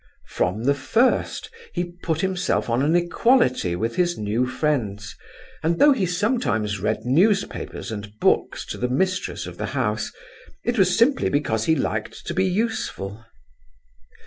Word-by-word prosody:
From 95 Hz, +6 st, -1 dB
the 140 Hz, +3 st, +4 dB
first 220 Hz, -, +1 dB, 0.2 s
he 175 Hz, -, +1 dB, 0.2 s
put 160 Hz, -1 st, -1 dB
himself 185 Hz, -9 st, 0 dB
on 120 Hz, +2 st, +2 dB
an 155 Hz, +4 st, +2 dB
equality 175 Hz, -, +2 dB
with 115 Hz, +6 st, -2 dB
his 175 Hz, -1 st, +1 dB
new 110 Hz, +4 st, 0 dB
friends, 120 Hz, -8 st, -2 dB, 0.5 s
and 165 Hz, +1 st, +1 dB
though 290 Hz, +8 st, +7 dB
he 210 Hz, -9 st, +1 dB
sometimes 175 Hz, -, 0 dB
read 110 Hz, +3 st, -1 dB
newspapers 190 Hz, -, +1 dB
and 105 Hz, -1 st, -6 dB
books -, -, +1 dB
to -, -, -5 dB
the 125 Hz, -, 0 dB
mistress 185 Hz, +8 st, -1 dB
of -, -, -9 dB
the -, -, -2 dB
house, -, -, -1 dB, 0.5 s
it 240 Hz, -2 st, 0 dB
was 185 Hz, -1 st, +4 dB
simply 255 Hz, +4 st, +3 dB
because 110 Hz, -7 st, 0 dB
he 160 Hz, -, +3 dB
liked 110 Hz, -6 st, -3 dB
to -, -, -3 dB
be 190 Hz, +1 st, +2 dB
useful. 180 Hz, -, -2 dB
150 Hz, 150 wpm, -23 LUFS, -, 0.5 s, though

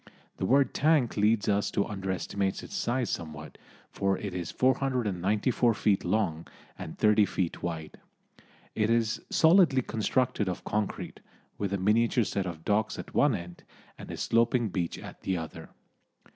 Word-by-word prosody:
The 95 Hz, -, -1 dB
word 135 Hz, +2 st, +3 dB
tank 150 Hz, -5 st, +2 dB
leads 105 Hz, 0 st, +2 dB
us 100 Hz, 0 st, +1 dB
to 100 Hz, -, 0 dB
underestimate 95 Hz, 0 st, -3 dB
its -, -, -10 dB
size 120 Hz, 0 st, -1 dB
somewhat, 75 Hz, -2 st, -6 dB, 0.3 s
for 100 Hz, -1 st, 0 dB
it 100 Hz, -3 st, -5 dB
is 90 Hz, -2 st, -4 dB
494 120 Hz, -3 st, +1 dB
feet 100 Hz, -1 st, +1 dB
long 90 Hz, -4 st, -1 dB, 0.3 s
and 80 Hz, -, -8 dB
30 105 Hz, -1 st, +4 dB
feet 90 Hz, -3 st, -2 dB
wide. 80 Hz, -3 st, -5 dB, 0.7 s
It 110 Hz, 0 st, +1 dB
is 115 Hz, -1 st, +1 dB
solidly 160 Hz, -6 st, +5 dB
constructed 115 Hz, -2 st, 0 dB
of 90 Hz, -, -5 dB
concrete, 105 Hz, -1 st, -3 dB, 0.4 s
with 100 Hz, -2 st, -2 dB
a 100 Hz, -, 0 dB
miniature 115 Hz, +5 st, +2 dB
set 100 Hz, -2 st, -2 dB
of 80 Hz, -2 st, -7 dB
docks 110 Hz, +1 st, +1 dB
at -, -, -8 dB
one 145 Hz, -5 st, +3 dB
end, 85 Hz, -1 st, -8 dB, 0.3 s
and -, -, -11 dB
a -, -, -5 dB
sloping 115 Hz, 0 st, +2 dB
beach 90 Hz, -3 st, -2 dB
at -, -, -10 dB
the 95 Hz, -1 st, -1 dB
other. 80 Hz, -1 st, -7 dB
105 Hz, 155 wpm, -28 LUFS, 95-120 Hz, 0.7 s, solidly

